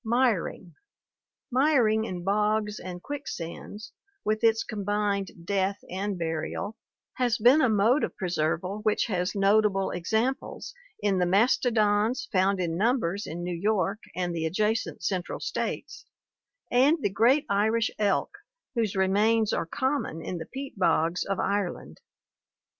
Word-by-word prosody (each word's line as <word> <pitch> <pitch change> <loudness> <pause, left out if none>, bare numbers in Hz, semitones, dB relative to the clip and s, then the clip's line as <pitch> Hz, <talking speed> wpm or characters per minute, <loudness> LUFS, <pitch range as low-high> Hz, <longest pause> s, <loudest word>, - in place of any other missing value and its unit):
Miring* 225 -7 0 0.4
— - - -64
Miring 245 -5 +3
in 180 -4 -5
bogs 210 +2 0
and 180 -1 -8
quicksands, 210 - -7 0.3
with 215 +1 0
its 225 -1 +4
combined 200 -3 -2
death 195 0 0
and 195 +1 -2
burial, 165 +5 -3 0.4
has 245 -2 +1
been 250 +7 +6
a 255 - +4
mode 220 +7 +3
of - - -3
preserval 180 +2 -1
which 215 -1 +1
has 185 -2 -1
notable 200 -1 +3
examples 220 +9 -2 0.3
inthe 185 -3 +2
mastodons 215 +1 +2
found 195 -1 +2
in 170 -2 -1
numbers 205 -3 0
in 170 +2 -5
New 175 0 -3
York 200 +2 0 0.2
and 175 -1 -1
the 160 -1 -1
adjacent 215 +6 -1
central 185 -3 -2
states, 465 - -4 0.6
and 270 +7 +5
the - - +2
great 245 +8 +3
Irish 215 +3 +1
elk 205 -2 0 0.3
whose 225 -5 -1
remains 210 +3 +2
are 165 - -1
common 260 - -1
in 180 - -4
the 160 - -7
peat 270 -5 -8
bogs 165 -1 +2
of 195 -1 -2
Ireland. 200 -3 -2
205 Hz, 135 wpm, -27 LUFS, 185-225 Hz, 0.6 s, been